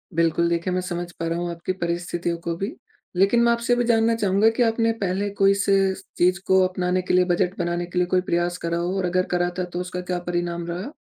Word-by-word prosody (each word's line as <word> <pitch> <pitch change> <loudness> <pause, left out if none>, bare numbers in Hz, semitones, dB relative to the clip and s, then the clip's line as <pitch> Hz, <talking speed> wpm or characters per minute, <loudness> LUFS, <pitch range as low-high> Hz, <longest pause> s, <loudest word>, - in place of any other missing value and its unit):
बिल्कुल, 165 0 +2
देखिए 170 +2 -1
मैं 185 - 0
समझ 175 -1 -4
पा 165 - -2
रहा 165 +1 -1
हूँ 175 0 -2
आपकी 170 +2 -4
परिस्थितियों 170 0 -2
को 170 0 -3
भी 195 +6 -3 0.4
लेकिन 195 +6 +4
मैं 235 - +4
आपसे 235 +1 +1
भी 245 - +1
जानना 230 -1 +3
चाहूँगा 205 0 +3
कि 245 - +3
आपने 230 0 +2
पहले 195 +1 0
कोई 195 0 +5
सी 200 0 0 0.5
चीज़ 180 0 +3
को 190 0 +5
अपनाने 185 0 -1
के 180 - -2
लिए 180 0 +5
बजट 180 +1 0
बनाने 175 0 -1
के 175 +1 -7
लिए 180 - +3
कोई 180 0 +2
प्रयास 175 0 -1
करा 170 0 -2
हो? 175 +3 -1
और 190 - 0
अगर 185 +1 +1
करा 175 0 +1
था - - +1
तो 175 0 -5
उसका 180 0 -5
क्या 180 0 -3
परिणाम 175 -1 -2
रहा? 180 +10 -5
180 Hz, 240 wpm, -23 LUFS, 175-195 Hz, 0.5 s, कोई